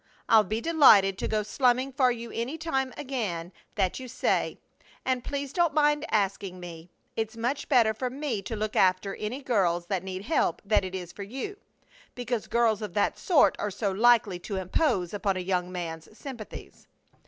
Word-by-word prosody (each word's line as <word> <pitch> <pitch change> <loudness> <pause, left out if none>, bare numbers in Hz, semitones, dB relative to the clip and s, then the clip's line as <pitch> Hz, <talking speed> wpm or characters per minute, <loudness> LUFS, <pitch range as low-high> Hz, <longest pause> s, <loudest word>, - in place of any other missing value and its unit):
I'll 220 -1 +6
be 215 +2 -3
delighted 215 - +6
to - - -1
go 215 -1 0
slumming 255 +4 +1
for 260 -2 +3
you 235 -1 -6
any 250 +7 -3
time 270 -5 -1
again 205 -12 -3 0.2
that 190 0 0
you 260 - -7
say, 245 - 0 0.5
and 255 -2 0
please 280 -1 -4
don't 340 -4 +2
mind 295 0 +3
asking 195 -2 -1
me. 170 -1 -9 0.3
It's 220 0 -3
much 250 +5 -2
better 235 -6 +4
for 250 +3 -3
me 260 -5 -3
to 225 - -3
look 215 0 -3
after 185 +1 +3
any 245 +7 -4
girls 180 -9 +1
that 185 0 -2
need 190 0 -5
help 310 +9 +1
than 210 -1 +3
it 185 0 -5
is 180 -2 -6
for 200 - -10
you, 265 - -5 0.6
because 245 -2 -3
girls 230 -2 +2
of 210 -5 -6
that 205 - +1
sort 350 -7 +4
are 210 - -1
so 200 0 -2
likely 215 -3 +4
to 195 +3 -5
impose 190 - 0
upon 200 -2 0
a - - -2
young 180 -1 -1
man's 170 +2 -6
sympathies. 255 -7 -9
220 Hz, 185 wpm, -27 LUFS, 190-260 Hz, 0.6 s, I'll